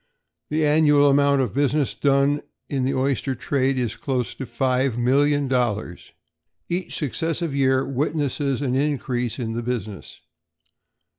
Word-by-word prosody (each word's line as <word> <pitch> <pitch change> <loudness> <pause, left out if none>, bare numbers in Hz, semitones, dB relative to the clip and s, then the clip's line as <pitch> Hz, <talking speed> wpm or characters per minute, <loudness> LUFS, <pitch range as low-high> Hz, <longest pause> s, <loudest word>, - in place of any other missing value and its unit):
The 155 0 +1
annual 145 -1 +4
amount 140 0 +3
of 120 - -4
business 145 0 +1
done 140 +1 +2 0.3
in 135 -3 -1
the 135 - 0
oyster 135 0 0
trade 135 -1 0
is 120 -4 -1
close 130 -4 -2
on - - -25
to - - -24
$5,000,000. 130 -4 0 0.6
Each 180 +1 -3
successive 165 +2 -2
year 130 -1 +2
witnesses 140 0 -1
an 125 -2 -1
increase 130 -4 -1
in 115 -4 -3
the 120 - -3
business. 110 -5 -5
135 Hz, 130 wpm, -23 LUFS, 125-145 Hz, 0.6 s, annual